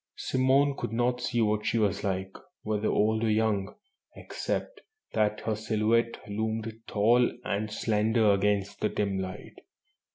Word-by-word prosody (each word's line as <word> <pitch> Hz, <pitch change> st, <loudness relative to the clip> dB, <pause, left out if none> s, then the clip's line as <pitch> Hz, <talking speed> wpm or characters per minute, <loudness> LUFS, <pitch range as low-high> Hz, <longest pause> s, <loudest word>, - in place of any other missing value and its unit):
Simone 135 Hz, +2 st, +2 dB
could -, -, -4 dB
not 120 Hz, +2 st, 0 dB
see 120 Hz, -1 st, 0 dB
what 105 Hz, 0 st, +1 dB
she 115 Hz, -, 0 dB
was 105 Hz, -3 st, +1 dB
like, 95 Hz, -1 st, -2 dB, 0.3 s
whether 110 Hz, 0 st, -1 dB
old 110 Hz, +1 st, +2 dB
or 115 Hz, -, +2 dB
young, 105 Hz, -2 st, 0 dB, 0.4 s
except -, -, -4 dB, 0.3 s
that 105 Hz, -1 st, +1 dB
her 110 Hz, -, -1 dB
silhouette 110 Hz, +2 st, +1 dB
loomed 110 Hz, +1 st, -2 dB
tall 120 Hz, +4 st, +3 dB
and 105 Hz, -1 st, -2 dB
slender 110 Hz, 0 st, +2 dB
against 100 Hz, 0 st, 0 dB
the 105 Hz, -, +1 dB
dim 100 Hz, -2 st, -1 dB
light. 95 Hz, +1 st, -7 dB
110 Hz, 140 wpm, -28 LUFS, 105-115 Hz, 0.4 s, tall